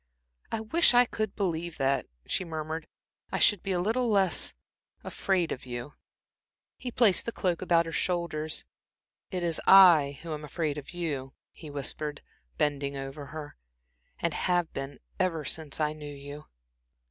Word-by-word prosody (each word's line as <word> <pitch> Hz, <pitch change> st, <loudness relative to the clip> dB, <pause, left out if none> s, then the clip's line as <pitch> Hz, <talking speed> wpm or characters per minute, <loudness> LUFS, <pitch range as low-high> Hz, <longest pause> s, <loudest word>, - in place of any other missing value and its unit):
"I 220 Hz, -, -1 dB
wish 245 Hz, +4 st, +4 dB
I 245 Hz, +1 st, +7 dB
could 215 Hz, -4 st, -3 dB
believe 170 Hz, -4 st, -2 dB
that," 135 Hz, 0 st, +1 dB, 0.2 s
she -, -, -1 dB
murmured. 160 Hz, -1 st, -5 dB, 0.4 s
"I -, -, 0 dB
should 205 Hz, -4 st, +4 dB
be 195 Hz, -, -3 dB
a 180 Hz, -, +1 dB
little 230 Hz, +6 st, +1 dB
less 195 Hz, -5 st, +3 dB, 0.5 s
afraid 185 Hz, -4 st, 0 dB
of 130 Hz, -, -4 dB
you." 120 Hz, +4 st, -6 dB, 0.8 s
He 255 Hz, -, -6 dB
placed 230 Hz, -5 st, +4 dB
the -, -, 0 dB
cloak 180 Hz, -6 st, -1 dB
about 170 Hz, -2 st, +3 dB
her 165 Hz, -, -5 dB
shoulders. 160 Hz, -3 st, -1 dB, 0.6 s
"It 180 Hz, -2 st, -3 dB
is 170 Hz, -2 st, 0 dB
I 165 Hz, -8 st, +8 dB
who 165 Hz, -2 st, -4 dB
am 150 Hz, 0 st, -6 dB
afraid 150 Hz, 0 st, -2 dB
of 140 Hz, -, -12 dB
you," 145 Hz, -7 st, -4 dB, 0.2 s
he 155 Hz, -, -11 dB
whispered, 145 Hz, +1 st, -3 dB, 0.3 s
bending 140 Hz, -1 st, 0 dB
over 135 Hz, +1 st, -6 dB
her, 150 Hz, +1 st, -8 dB, 0.6 s
"and 170 Hz, -2 st, -1 dB
have 175 Hz, -2 st, 0 dB
been 135 Hz, 0 st, -5 dB, 0.2 s
ever 165 Hz, -5 st, 0 dB
since 155 Hz, +2 st, -2 dB
I 150 Hz, -1 st, +1 dB
knew 150 Hz, -1 st, -8 dB
you." 145 Hz, +2 st, -9 dB
160 Hz, 160 wpm, -29 LUFS, 145-185 Hz, 0.8 s, I